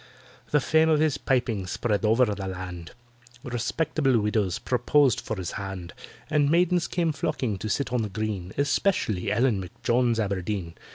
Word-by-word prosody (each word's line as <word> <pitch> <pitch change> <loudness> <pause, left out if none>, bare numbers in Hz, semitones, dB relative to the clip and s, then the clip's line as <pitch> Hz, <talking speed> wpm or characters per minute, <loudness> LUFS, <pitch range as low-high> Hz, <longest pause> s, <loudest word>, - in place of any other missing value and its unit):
The 150 - +3
fame 160 +3 +3
of 155 -2 +4
his 150 -2 +1
piping 115 -7 0
spread 105 +2 -1
over 115 +4 +4
the 100 -3 -3
land: 90 -2 -7 0.5
Respectable 125 +2 0
widows 105 -3 0
proposed 130 +1 +2
for 110 - -4
his 90 -2 -4
hand, 95 -3 -6 0.3
And 145 -1 +2
maidens 175 +1 +3
came 170 -3 0
flocking 125 -8 -2
to 110 - -4
sit 125 +3 -1
on 125 - +2
the 105 - -3
green— 100 -3 -3
Especially 135 - +1
ELLEN 115 -1 +2
M'JONES 115 +6 0
ABERDEEN. 100 -4 -2
115 Hz, 155 wpm, -26 LUFS, 100-140 Hz, 0.5 s, of